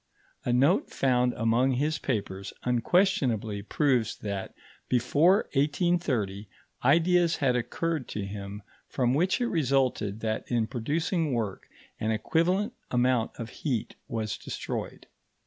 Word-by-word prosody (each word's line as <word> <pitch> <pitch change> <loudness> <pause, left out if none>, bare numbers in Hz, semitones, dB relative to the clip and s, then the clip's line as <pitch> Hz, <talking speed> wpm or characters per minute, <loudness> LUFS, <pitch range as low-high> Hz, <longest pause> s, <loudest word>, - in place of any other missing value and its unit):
A - - +1
note 140 - +3
found 125 -2 +2
among 115 +4 +2
his 150 +4 0
papers 100 -7 -3
unquestionably 120 - +1
proves 125 0 +1
that, 100 -2 -5 0.3
before 150 - +4
1830, 140 - 0 0.3
ideas 170 +5 +4
had 130 -3 +1
occurred 155 +4 -2
to 105 - -4
him 100 +1 -7 0.2
from 125 -1 +1
which 180 +6 +2
it 245 - +1
resulted 130 - 0
that 110 -1 -1
in 120 -2 +1
producing 155 - -1
work 110 -5 -3 0.3
an 110 - -1
equivalent 170 - +1 0.2
amount 125 -2 +1
of 115 -1 -6
heat 125 -8 -3
was 110 -2 -3
destroyed. - - -5
125 Hz, 120 wpm, -28 LUFS, 110-155 Hz, 0.3 s, before